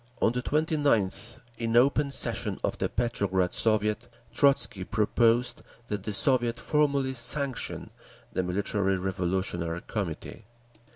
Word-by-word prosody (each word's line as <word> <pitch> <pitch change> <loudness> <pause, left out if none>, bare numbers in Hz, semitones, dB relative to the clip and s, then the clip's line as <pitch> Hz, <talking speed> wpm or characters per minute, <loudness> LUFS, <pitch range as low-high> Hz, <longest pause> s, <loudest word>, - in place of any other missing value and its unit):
On - - +3
the 125 +1 -2
29th, 140 -8 0 0.2
in 115 0 +1
open 140 +3 +3
session 135 - -1
of - - 0
the - - 0
Petrograd 100 -6 0
Soviet, 110 +1 +1 0.3
Trotzky 135 -8 +2
proposed 115 +4 +1 0.3
that 105 -2 -2
the 105 - -4
Soviet 120 0 +4
formally 140 -2 +1
sanction 130 +1 -2 0.4
the - - 0
Military 95 +1 0
Revolutionary 90 -2 -2
Committee. 100 +1 -5
115 Hz, 115 wpm, -27 LUFS, 95-130 Hz, 0.4 s, Soviet